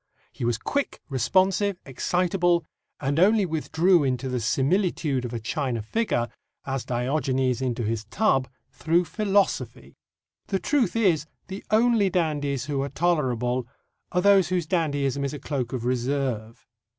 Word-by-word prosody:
He -, -, -8 dB
was 120 Hz, -1 st, +1 dB
quick, 280 Hz, -, -2 dB
responsive, 185 Hz, -, +2 dB
excitable, 175 Hz, +4 st, +1 dB, 0.3 s
and 140 Hz, +2 st, 0 dB
only 205 Hz, +3 st, +5 dB
withdrew 165 Hz, +1 st, +2 dB
into, 130 Hz, 0 st, -1 dB
the 125 Hz, -1 st, -1 dB
similitude 140 Hz, -, 0 dB
of 120 Hz, -, -5 dB
a 120 Hz, -, -3 dB
china 120 Hz, 0 st, -2 dB
figure, 120 Hz, -, 0 dB, 0.4 s
as 135 Hz, -2 st, -3 dB
Diogenes 130 Hz, 0 st, 0 dB
into 125 Hz, -2 st, -1 dB
his 110 Hz, 0 st, -2 dB
tub, 135 Hz, -, +1 dB, 0.2 s
through 170 Hz, +3 st, +1 dB
philosophy. 200 Hz, 0 st, 0 dB, 0.5 s
The 195 Hz, -, 0 dB
truth 265 Hz, +4 st, 0 dB
is, 175 Hz, -9 st, +2 dB, 0.2 s
the 190 Hz, +1 st, -6 dB
only 220 Hz, -2 st, +3 dB
dandies 145 Hz, -7 st, -1 dB
who 140 Hz, -1 st, -1 dB
are 140 Hz, -, -2 dB
tolerable 130 Hz, -8 st, 0 dB, 0.4 s
are 180 Hz, -, +1 dB
those 195 Hz, -4 st, +5 dB
whose 180 Hz, -3 st, 0 dB
dandyism 145 Hz, -5 st, 0 dB
is 140 Hz, +1 st, -2 dB
a -, -, -7 dB
cloak 130 Hz, -5 st, -3 dB
of 125 Hz, -3 st, -4 dB
reserve. 125 Hz, -3 st, -2 dB
145 Hz, 140 wpm, -25 LUFS, 125-185 Hz, 0.5 s, only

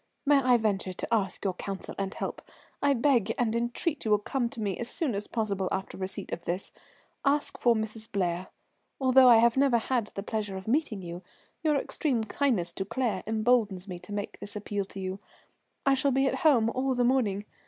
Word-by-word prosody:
"May 290 Hz, 0 st, +6 dB
I 250 Hz, -2 st, +5 dB
venture 200 Hz, -4 st, -1 dB
to 230 Hz, -, -4 dB
ask 205 Hz, -2 st, 0 dB
your 190 Hz, -, +1 dB
counsel 195 Hz, +1 st, -6 dB
and 195 Hz, -1 st, -1 dB
help? -, -, -5 dB, 0.4 s
I 285 Hz, -1 st, +3 dB
beg 235 Hz, -4 st, +2 dB
and 230 Hz, -2 st, +1 dB
entreat 240 Hz, +6 st, -1 dB
you 220 Hz, -, -2 dB
will 210 Hz, -, +5 dB
come 235 Hz, +4 st, -2 dB
to 235 Hz, -, -9 dB
me 200 Hz, -3 st, -1 dB
as 235 Hz, -, -3 dB
soon 305 Hz, -5 st, -1 dB
as 205 Hz, +1 st, -3 dB
possible 200 Hz, -4 st, -1 dB
after 195 Hz, 0 st, -3 dB
receipt 190 Hz, +1 st, -4 dB
of 170 Hz, -, -6 dB
this. 180 Hz, +3 st, -3 dB, 0.5 s
Ask 290 Hz, +1 st, +1 dB
for 240 Hz, -1 st, +4 dB
Mrs. 220 Hz, +1 st, -4 dB
Blair. 180 Hz, -3 st, -1 dB, 0.5 s
Although 260 Hz, -1 st, +6 dB
I 235 Hz, -, +9 dB
have 235 Hz, +2 st, +4 dB
never 270 Hz, -3 st, +4 dB
had 235 Hz, -1 st, 0 dB
the 195 Hz, -, -3 dB
pleasure 210 Hz, -3 st, -3 dB
of 190 Hz, -, -9 dB
meeting 235 Hz, -6 st, 0 dB
you, 175 Hz, +1 st, -6 dB, 0.4 s
your 310 Hz, -2 st, +2 dB
extreme 270 Hz, -4 st, 0 dB
kindness 215 Hz, -7 st, 0 dB
to 190 Hz, -, -2 dB
Claire 220 Hz, -3 st, -1 dB
emboldens 215 Hz, -4 st, +1 dB
me 180 Hz, -2 st, -6 dB
to 180 Hz, +3 st, -12 dB
make 205 Hz, 0 st, -4 dB
this 205 Hz, -, -9 dB
appeal 205 Hz, -1 st, -3 dB
to 195 Hz, -, -9 dB
you. 190 Hz, +1 st, -4 dB, 0.7 s
I 275 Hz, -, +5 dB
shall 270 Hz, +1 st, +2 dB
be 270 Hz, +1 st, +2 dB
at 270 Hz, -, 0 dB
home 245 Hz, -9 st, +4 dB
all 260 Hz, +1 st, 0 dB
the 245 Hz, -, +2 dB
morning. 225 Hz, -6 st, +1 dB
220 Hz, 205 wpm, -28 LUFS, 195-255 Hz, 0.7 s, I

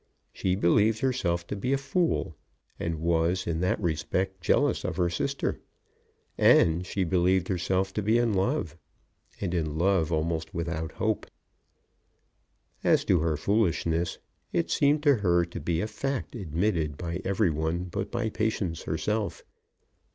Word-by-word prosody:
She 90 Hz, -1 st, 0 dB
believed 105 Hz, +4 st, +3 dB
herself 90 Hz, -10 st, 0 dB
to 105 Hz, -, -4 dB
be 125 Hz, +7 st, -1 dB
a -, -, +3 dB
fool, 160 Hz, +6 st, 0 dB, 0.4 s
and 85 Hz, -2 st, -2 dB
was 85 Hz, +2 st, +1 dB
in 80 Hz, -1 st, -1 dB
that 90 Hz, +1 st, +1 dB
respect 90 Hz, +2 st, -1 dB
jealous -, -, +2 dB
of -, -, -3 dB
her 90 Hz, -2 st, +1 dB
sister; 140 Hz, +10 st, -2 dB, 0.8 s
and 85 Hz, +2 st, +5 dB
she 95 Hz, -, -1 dB
believed 90 Hz, +1 st, +2 dB
herself 95 Hz, +1 st, 0 dB
to 105 Hz, -, -1 dB
be 110 Hz, +3 st, +3 dB
in 120 Hz, -2 st, +2 dB
love, 95 Hz, -4 st, 0 dB, 0.6 s
and 90 Hz, -3 st, -2 dB
in 80 Hz, -3 st, -1 dB
love 85 Hz, -2 st, +2 dB
almost 80 Hz, 0 st, -1 dB
without 85 Hz, -1 st, -3 dB
hope. 110 Hz, -1 st, -1 dB, 1.6 s
As -, -, +3 dB
to 90 Hz, -, +3 dB
her 80 Hz, -1 st, 0 dB
foolishness, 85 Hz, -3 st, 0 dB, 0.3 s
it 85 Hz, -1 st, 0 dB
seemed 145 Hz, +1 st, +3 dB
to 145 Hz, -4 st, +5 dB
her 85 Hz, -4 st, +2 dB
to 85 Hz, -, -7 dB
be 85 Hz, -1 st, -1 dB
a 105 Hz, -, -1 dB
fact 135 Hz, +5 st, -3 dB
admitted 85 Hz, -, -1 dB
by 85 Hz, +1 st, -4 dB
every 100 Hz, -2 st, +1 dB
one 80 Hz, +3 st, -1 dB
but 90 Hz, -1 st, -4 dB
by 120 Hz, -2 st, -1 dB
Patience 105 Hz, -7 st, -1 dB
herself. 105 Hz, +7 st, -2 dB
90 Hz, 150 wpm, -27 LUFS, 85-105 Hz, 1.6 s, and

